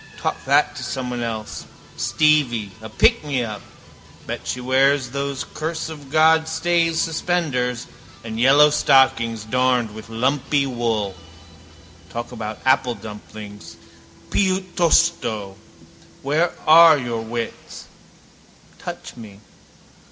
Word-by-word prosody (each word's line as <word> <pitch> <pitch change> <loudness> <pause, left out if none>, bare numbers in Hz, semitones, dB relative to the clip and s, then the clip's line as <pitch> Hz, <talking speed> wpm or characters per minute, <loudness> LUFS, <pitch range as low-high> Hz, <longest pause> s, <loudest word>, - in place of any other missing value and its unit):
Talk - - -4
that - - +2
to - - -6
someone 125 -2 -4
else, 110 -2 -5 0.3
Stevie: 135 -9 +1
a 110 - -8
pickmeup. 120 -1 +1 0.6
Bet - - -6
she 125 - -3
wears 130 +1 +2
those 140 0 -3
curse 160 +1 -4
of 145 -4 -10
God 160 +1 +4
stays 165 0 +1
suspenders 155 -8 -1 0.4
and 110 0 -6
yellow 145 +4 +6
stockings, 115 -6 +3
darned 125 -1 +1
with 110 +1 -11
lumpy 135 +4 0
wool. 115 -6 -2 1.0
Talk 120 +1 -6
about 110 -3 -6
apple 130 -2 +2
dumplings, 105 0 -11 0.5
piuttosto. 170 - +1 0.7
Where 155 +5 +1
are 160 0 +8
your 120 -4 -3
wits? 115 +1 -6 0.9
Touch - - -8
me. 105 -4 -12
130 Hz, 105 wpm, -21 LUFS, 115-155 Hz, 1.0 s, are